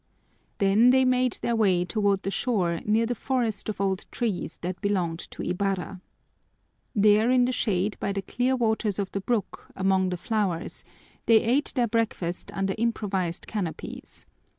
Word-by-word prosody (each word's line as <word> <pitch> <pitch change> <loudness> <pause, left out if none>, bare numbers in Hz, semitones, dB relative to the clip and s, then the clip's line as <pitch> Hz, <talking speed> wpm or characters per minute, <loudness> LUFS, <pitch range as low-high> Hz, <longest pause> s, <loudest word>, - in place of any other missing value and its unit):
Then 205 +5 +5
they 260 +1 +5
made 255 -2 +2
their 235 - +1
way 190 -5 +3
toward 200 -1 0
the 195 - -2
shore 185 -9 0
near 220 +2 +3
the 240 - -1
forest 235 -5 -2
of 210 - -4
old 190 -1 -1
trees 205 -8 -3
that 180 +1 -4
belonged 180 -5 0
to - - -7
Ibarra. 190 -1 -2 0.9
There 210 +2 +4
in 250 -1 +4
the 250 - 0
shade 205 -4 0
by 200 - -1
the 195 0 -3
clear 250 +6 0
waters 220 -4 0
of 200 -2 -2
the 200 - -3
brook, 220 0 -2
among 190 -1 +2
the 180 - -3
flowers, 195 -4 -2 0.4
they 225 -1 +6
ate 260 +6 +1
their 245 -3 +2
breakfast 210 -6 -2
under 195 0 -1
improvised 195 -6 -1
canopies. 190 -7 -6
205 Hz, 160 wpm, -26 LUFS, 190-230 Hz, 0.9 s, they